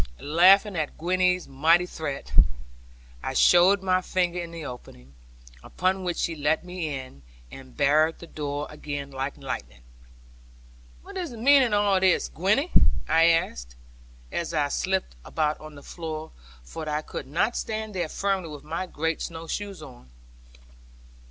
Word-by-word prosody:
Laughing 190 Hz, +6 st, +5 dB
at 155 Hz, -3 st, -3 dB
Gwenny's 180 Hz, +1 st, +1 dB
mighty 165 Hz, +6 st, +3 dB
threat, 150 Hz, -5 st, -6 dB, 0.9 s
I -, -, -4 dB
showed 185 Hz, +3 st, +5 dB
my 185 Hz, -1 st, +2 dB
finger 180 Hz, -1 st, -1 dB
in 170 Hz, -1 st, -5 dB
the 165 Hz, -2 st, -8 dB
opening; 70 Hz, -, -10 dB, 0.5 s
upon 185 Hz, -, -1 dB
which 175 Hz, -2 st, -2 dB
she 165 Hz, -, -1 dB
let 155 Hz, +3 st, 0 dB
me 180 Hz, -3 st, -4 dB
in, 130 Hz, -, -12 dB, 0.3 s
and 130 Hz, -2 st, -12 dB
barred 155 Hz, +3 st, +3 dB
the -, -, -10 dB
door 145 Hz, -2 st, -4 dB
again 145 Hz, -2 st, -6 dB
like 135 Hz, +1 st, -4 dB
lightning. 60 Hz, -, -6 dB, 1.2 s
'What -, -, -9 dB
is 355 Hz, -3 st, -3 dB
the 235 Hz, -, -9 dB
meaning 270 Hz, +2 st, +5 dB
of 205 Hz, 0 st, +3 dB
all 195 Hz, -2 st, +3 dB
this, 185 Hz, -1 st, +2 dB
Gwenny?' 215 Hz, -, +1 dB, 0.4 s
I 165 Hz, +1 st, +5 dB
asked, -, -, +1 dB, 0.6 s
as 170 Hz, -1 st, -3 dB
I 145 Hz, -2 st, +1 dB
slipped 190 Hz, -, -1 dB
about 155 Hz, -1 st, -1 dB
on 155 Hz, -1 st, -11 dB
the 140 Hz, -, -12 dB
floor, 160 Hz, -2 st, -6 dB, 0.3 s
for 155 Hz, -, -7 dB
I 150 Hz, +1 st, -1 dB
could -, -, -7 dB
not 175 Hz, -, 0 dB
stand 220 Hz, -1 st, -3 dB
there 175 Hz, -4 st, -2 dB
firmly 195 Hz, -3 st, -1 dB
with 150 Hz, -1 st, -9 dB
my 165 Hz, +5 st, -4 dB
great 165 Hz, -1 st, -2 dB
snow 165 Hz, -1 st, -6 dB
shoes 195 Hz, 0 st, -5 dB
on. 125 Hz, -, -13 dB
165 Hz, 155 wpm, -26 LUFS, 145-185 Hz, 1.2 s, Laughing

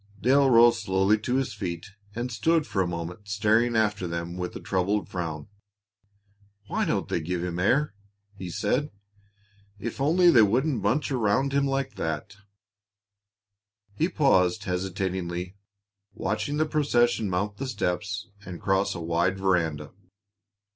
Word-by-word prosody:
Dale 135 Hz, +5 st, +4 dB
rose 115 Hz, -1 st, +6 dB
slowly 95 Hz, +1 st, +2 dB
to 125 Hz, +4 st, -2 dB
his 130 Hz, -3 st, -1 dB
feet, 90 Hz, -2 st, -5 dB, 0.2 s
and 120 Hz, +2 st, -3 dB
stood 160 Hz, +6 st, +1 dB
for 95 Hz, -, -1 dB
a 90 Hz, -, 0 dB
moment 85 Hz, +4 st, -6 dB
staring 110 Hz, +4 st, +2 dB
after 105 Hz, -4 st, +1 dB
them 85 Hz, +1 st, -4 dB
with 90 Hz, -1 st, -5 dB
a -, -, -5 dB
troubled 100 Hz, +2 st, -1 dB
frown. 80 Hz, -4 st, -4 dB, 1.2 s
"Why -, -, -1 dB
don't -, -, -1 dB
they -, -, -1 dB
give 90 Hz, +2 st, -3 dB
him 90 Hz, -1 st, -3 dB
air?" 130 Hz, +7 st, +2 dB, 0.4 s
he 95 Hz, -2 st, -7 dB
said. 125 Hz, -, -1 dB, 0.9 s
"If 115 Hz, +5 st, -5 dB
only 170 Hz, +5 st, +5 dB
they 120 Hz, -, +7 dB
wouldn't 120 Hz, +4 st, +2 dB
bunch 130 Hz, +10 st, 0 dB
around 130 Hz, +3 st, +1 dB
him 140 Hz, 0 st, +2 dB
like 135 Hz, 0 st, -2 dB
that 80 Hz, +4 st, -4 dB, 0.8 s
" 100 Hz, 0 st, -47 dB
He 165 Hz, -, +2 dB
paused 105 Hz, -, +2 dB
hesitatingly, 90 Hz, -1 st, -3 dB, 0.6 s
watching 110 Hz, +9 st, -2 dB
the 155 Hz, -, +2 dB
procession 120 Hz, -8 st, +1 dB
mount 100 Hz, +3 st, -2 dB
the 135 Hz, -, -4 dB
steps 100 Hz, -3 st, -2 dB, 0.2 s
and 90 Hz, -3 st, -8 dB
cross 95 Hz, 0 st, +1 dB
a -, -, -5 dB
wide 85 Hz, +3 st, 0 dB
veranda. 85 Hz, -6 st, 0 dB
100 Hz, 145 wpm, -26 LUFS, 90-120 Hz, 1.2 s, they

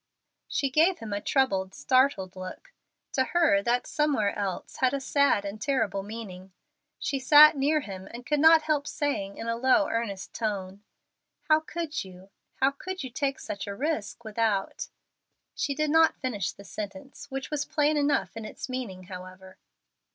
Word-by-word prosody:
She 275 Hz, -2 st, -1 dB
gave 330 Hz, +6 st, +4 dB
him 220 Hz, -2 st, -6 dB
a 205 Hz, -, -2 dB
troubled, 195 Hz, -7 st, +1 dB
startled 255 Hz, -8 st, +2 dB
look. 185 Hz, -, -9 dB, 0.4 s
To 260 Hz, -, +2 dB
her 315 Hz, -3 st, +3 dB
that 245 Hz, -2 st, +1 dB
"somewhere 290 Hz, -10 st, +1 dB
else" 195 Hz, -3 st, -4 dB
had 260 Hz, +1 st, +2 dB
a -, -, -1 dB
sad 275 Hz, -6 st, +2 dB
and 205 Hz, +2 st, -6 dB
terrible 215 Hz, -8 st, 0 dB
meaning. 195 Hz, -3 st, -9 dB, 0.4 s
She 275 Hz, -, -2 dB
sat 300 Hz, +3 st, +8 dB
near 295 Hz, +3 st, +2 dB
him, 190 Hz, -5 st, -8 dB
and 240 Hz, +1 st, -9 dB
could 295 Hz, +1 st, +1 dB
not 320 Hz, +1 st, +7 dB
help 300 Hz, -2 st, 0 dB
saying 200 Hz, -12 st, -2 dB
in 230 Hz, -, -6 dB
a 230 Hz, -, 0 dB
low, 260 Hz, +6 st, +3 dB
earnest 210 Hz, -4 st, -3 dB
tone, 200 Hz, -3 st, -3 dB, 0.7 s
"How 310 Hz, 0 st, +6 dB
could 320 Hz, -1 st, -4 dB
you, 190 Hz, 0 st, -14 dB, 0.2 s
how 270 Hz, +1 st, +2 dB
could 370 Hz, +5 st, -6 dB
you 260 Hz, -, -6 dB
take 275 Hz, 0 st, -1 dB
such 200 Hz, -, -6 dB
a 200 Hz, -, -4 dB
risk 240 Hz, -5 st, -3 dB
without 215 Hz, -2 st, -1 dB, 0.3 s
" -, -, -55 dB, 0.3 s
She 280 Hz, -, -2 dB
did 305 Hz, 0 st, 0 dB
not 320 Hz, 0 st, +5 dB
finish 205 Hz, -7 st, -2 dB
the 200 Hz, -, -14 dB
sentence, 270 Hz, +9 st, -8 dB
which 270 Hz, +1 st, -5 dB
was 300 Hz, -1 st, 0 dB
plain 300 Hz, 0 st, +1 dB
enough 290 Hz, -4 st, +1 dB
in 225 Hz, -, -6 dB
its 215 Hz, -, -7 dB
meaning, 240 Hz, -8 st, -5 dB
however. 185 Hz, 0 st, -11 dB
255 Hz, 175 wpm, -27 LUFS, 200-295 Hz, 0.7 s, sat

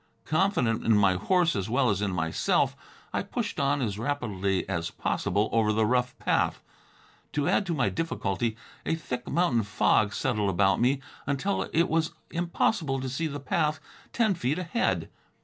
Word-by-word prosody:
Confident 155 Hz, -, +1 dB
in 115 Hz, -2 st, +4 dB
my 100 Hz, -2 st, +4 dB
horse 170 Hz, -, +2 dB
as 100 Hz, 0 st, -2 dB
well 125 Hz, 0 st, +3 dB
as 100 Hz, -1 st, -1 dB
in 100 Hz, -2 st, 0 dB
myself, 80 Hz, -3 st, +1 dB, 0.4 s
I -, -, +1 dB
pushed -, -, -4 dB
on 140 Hz, 0 st, +1 dB
as 105 Hz, -3 st, -2 dB
rapidly 105 Hz, -8 st, -1 dB
as 85 Hz, -3 st, -2 dB
possible 100 Hz, +3 st, 0 dB
over 110 Hz, -2 st, +3 dB
the 110 Hz, +1 st, +2 dB
rough 125 Hz, +2 st, +1 dB
path. -, -, 0 dB, 0.7 s
To 145 Hz, 0 st, 0 dB
add 195 Hz, +2 st, +2 dB
to 170 Hz, -, 0 dB
my 130 Hz, -4 st, +2 dB
difficulty, 115 Hz, -8 st, -2 dB, 0.3 s
a -, -, 0 dB
thick 125 Hz, -5 st, -5 dB
mountain 165 Hz, -10 st, +2 dB
fog 105 Hz, 0 st, +2 dB
settled 105 Hz, -7 st, 0 dB
about 95 Hz, +2 st, +2 dB
me 130 Hz, +3 st, +2 dB, 0.3 s
until 140 Hz, +9 st, -1 dB
it 170 Hz, +1 st, +3 dB
was 160 Hz, 0 st, 0 dB, 0.2 s
impossible 170 Hz, -3 st, 0 dB
to 130 Hz, 0 st, -3 dB
see 160 Hz, +6 st, -2 dB
the 145 Hz, -1 st, -5 dB
path 150 Hz, +2 st, 0 dB, 0.3 s
ten 220 Hz, -4 st, +2 dB
feet 150 Hz, -3 st, -1 dB
ahead. 180 Hz, +7 st, 0 dB
125 Hz, 165 wpm, -27 LUFS, 105-160 Hz, 0.7 s, in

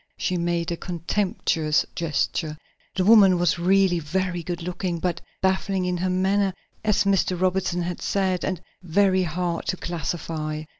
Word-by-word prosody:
She 185 Hz, -, -1 dB
made 170 Hz, 0 st, -1 dB
a 170 Hz, -, -2 dB
contemptuous 170 Hz, -3 st, 0 dB
gesture. 155 Hz, -1 st, -1 dB, 0.4 s
The 185 Hz, -, +1 dB
woman 200 Hz, -4 st, +7 dB
was 175 Hz, 0 st, +1 dB
really 185 Hz, 0 st, +3 dB
very 175 Hz, +3 st, -2 dB
good 170 Hz, 0 st, -5 dB
looking, 180 Hz, 0 st, -3 dB
but 170 Hz, 0 st, -2 dB, 0.2 s
baffling 190 Hz, 0 st, +1 dB
in 180 Hz, 0 st, -1 dB
her 185 Hz, +2 st, -1 dB
manner, 190 Hz, +1 st, +1 dB, 0.3 s
as 210 Hz, -2 st, +2 dB
Mr. 195 Hz, -2 st, +1 dB
Robinson 185 Hz, -1 st, 0 dB
had 175 Hz, 0 st, -4 dB
said, 190 Hz, -2 st, 0 dB
and 185 Hz, -3 st, -2 dB, 0.2 s
very 190 Hz, +2 st, +3 dB
hard 175 Hz, 0 st, -2 dB
to 185 Hz, -, -1 dB
classify. 155 Hz, -2 st, -4 dB
180 Hz, 150 wpm, -24 LUFS, 170-190 Hz, 0.4 s, woman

